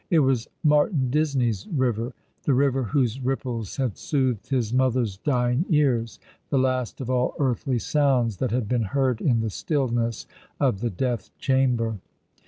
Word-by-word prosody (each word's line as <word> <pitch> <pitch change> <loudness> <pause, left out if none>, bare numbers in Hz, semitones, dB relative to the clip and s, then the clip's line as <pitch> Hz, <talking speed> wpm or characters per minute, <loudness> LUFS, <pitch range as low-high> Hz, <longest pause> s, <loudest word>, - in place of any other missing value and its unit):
It 170 - +3
was 130 -4 +1 0.2
Martin 150 - +3
Disney's 130 -9 0
river 125 -4 -1
— - - -43
the 140 - +3
river 135 -1 +2
whoso 125 +2 0
ripples 125 -5 -3
had 130 -7 -2
soothed 130 - -1
his 125 -4 0
mother's 125 -5 +1
dying 125 +2 +1
ears— 130 - +2 0.3
the 140 - +1
last 130 -1 0
of 130 0 -3
all 125 0 +1
earthly 130 -1 0
sounds 125 -5 +1
that 130 - -1
had 120 -2 -1
been 125 +1 +1 0.2
heard 130 -4 +1
in 120 -6 +2
the 110 -1 -2
stillness 120 - -1 0.3
of 95 - +1
the 120 +2 -1
death 115 +1 -2
chamber. 125 -5 +1
125 Hz, 160 wpm, -25 LUFS, 115-135 Hz, 0.3 s, It